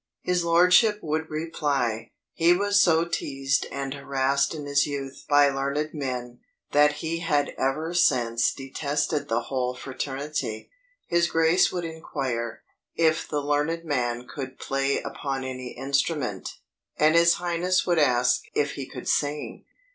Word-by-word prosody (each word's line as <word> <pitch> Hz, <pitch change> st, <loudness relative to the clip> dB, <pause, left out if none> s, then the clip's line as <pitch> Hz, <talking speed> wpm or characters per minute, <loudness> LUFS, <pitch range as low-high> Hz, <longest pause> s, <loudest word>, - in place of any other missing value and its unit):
His 180 Hz, -1 st, +1 dB
lordship 180 Hz, +6 st, +5 dB
would 160 Hz, 0 st, -2 dB
reply, 145 Hz, -8 st, -2 dB, 0.2 s
"He 170 Hz, +1 st, +4 dB
was 200 Hz, +2 st, +2 dB
so 165 Hz, -1 st, +4 dB
teased 135 Hz, -4 st, -1 dB
and 140 Hz, -1 st, -4 dB
harassed 140 Hz, +1 st, 0 dB
in 150 Hz, -2 st, -6 dB
his 140 Hz, 0 st, +2 dB
youth 140 Hz, -2 st, -6 dB
by 145 Hz, -1 st, +6 dB
learned 140 Hz, +3 st, -2 dB
men, 125 Hz, -4 st, -4 dB, 0.3 s
that 150 Hz, 0 st, +5 dB
he 165 Hz, +1 st, -2 dB
had 150 Hz, -4 st, +1 dB
ever 155 Hz, +6 st, -1 dB
since 120 Hz, -9 st, +2 dB
detested 145 Hz, +2 st, -2 dB
the 115 Hz, +1 st, +1 dB
whole 125 Hz, 0 st, -2 dB
fraternity." 135 Hz, -3 st, -4 dB, 0.3 s
His 170 Hz, 0 st, +2 dB
grace 165 Hz, +2 st, +3 dB
would 175 Hz, -2 st, -3 dB
inquire, 135 Hz, -8 st, -4 dB, 0.3 s
"if 160 Hz, -1 st, +2 dB
the 150 Hz, -1 st, -1 dB
learned 150 Hz, +4 st, -1 dB
man 125 Hz, -4 st, -1 dB
could 130 Hz, -1 st, -7 dB
play 135 Hz, 0 st, 0 dB
upon 135 Hz, -2 st, -4 dB
any 130 Hz, -1 st, -6 dB
instrument." 140 Hz, -, -1 dB, 0.4 s
And 155 Hz, +1 st, +4 dB
his 170 Hz, 0 st, +5 dB
highness 175 Hz, +1 st, 0 dB
would 175 Hz, -2 st, +2 dB
ask 125 Hz, -3 st, +3 dB
"if 140 Hz, -1 st, +1 dB
he 135 Hz, -2 st, -6 dB
could 125 Hz, -, -9 dB
sing." 145 Hz, 0 st, -1 dB
145 Hz, 140 wpm, -25 LUFS, 135-165 Hz, 0.4 s, by